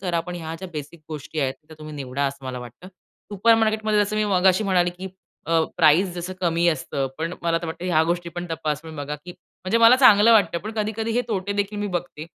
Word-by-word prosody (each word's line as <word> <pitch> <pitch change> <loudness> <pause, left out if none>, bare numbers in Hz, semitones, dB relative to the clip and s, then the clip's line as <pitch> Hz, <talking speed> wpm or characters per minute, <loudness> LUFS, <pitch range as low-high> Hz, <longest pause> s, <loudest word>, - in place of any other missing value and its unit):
करा. 175 -3 -1
पण 180 +1 -7
ह्या 160 -2 -6
ज्या 190 - -7
बेसिक 150 +2 -7
गोष्टी 155 0 -5
आहेत 135 -1 0
त्या 160 - -13
तुम्ही 155 0 -9
निवडा 140 0 -3
असं 140 0 -6
मला 130 -1 -5
वाटतं. 125 +9 -11 0.4
सुपरमार्केट 220 +1 +3
मध्ये 215 -1 +2
जसं 210 +1 -4
मी 215 - +2
मगाशी 185 +3 +3
म्हणाले 180 -3 +2
की 190 - -6 0.4
अ, 165 0 +3 0.2
प्राइज 175 +3 +4
जसं 180 +1 -5
कमी 170 -1 +1
असतं, 140 -3 -1
पण 165 +2 -3
मला 165 0 +1
तर - - -4
वाटत 160 +2 -7
ह्या 170 -3 +2
गोष्टी 170 +1 -2
पण 175 0 -4
तपासून 160 0 -4
बघा, 145 +1 -4
की 175 +4 -12
म्हणजे 185 +6 -4
मला 230 +2 +7
चांगलं 230 -3 +7
वाटतं, 170 -6 +3
पण 215 +5 -7
कधी-कधी 220 +1 -2
हे 245 - +2
तोटे 200 -2 -2
देखील 205 +1 -2
मी 205 - -2
बघते. 170 -3 -7
175 Hz, 225 wpm, -23 LUFS, 155-205 Hz, 0.4 s, मला